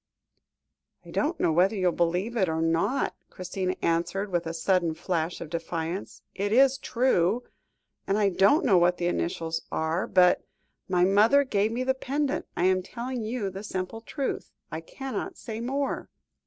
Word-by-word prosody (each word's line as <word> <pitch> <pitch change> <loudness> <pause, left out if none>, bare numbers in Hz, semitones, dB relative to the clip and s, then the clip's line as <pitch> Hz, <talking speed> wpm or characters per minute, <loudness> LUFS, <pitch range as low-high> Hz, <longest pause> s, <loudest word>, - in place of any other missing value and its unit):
"I - - -11
don't 315 +4 0
know - - +2
whether 185 +6 +3
you 190 -2 -1
will 180 - +4
believe 180 +7 0
it 190 -6 +2
or 160 0 -1
not," 165 +12 +1 0.2
Christina 185 0 -3
answered, 180 +4 0
with 175 -2 0
a - - -2
sudden 170 -1 +1
flash 170 0 -2
of 160 -3 -8
defiance, 165 +2 -4
"it 205 +1 -2
is 270 +3 +5
true. 240 -4 +1 0.6
And 195 - +2
I 205 -2 +3
don't 200 - +4
know 190 -6 +5
what 175 +1 +3
the 175 - -2
initials 170 -2 -1
are, 160 +3 -1
but 180 -2 +4 0.5
my 180 -1 +3
mother 215 +9 +5
gave 215 -4 +1
me 245 +2 -1
the 265 +1 +2
pendant. 275 +2 -2
I 175 - +1
am 185 0 +3
telling 245 +5 -5
you 220 -3 -2
the 190 +1 -7
simple 190 +2 -4
truth. 275 +3 -4 0.2
I 160 +1 -4
cannot 270 - -5
say 225 -1 -6
more." 275 +3 -2
190 Hz, 170 wpm, -27 LUFS, 175-240 Hz, 0.6 s, is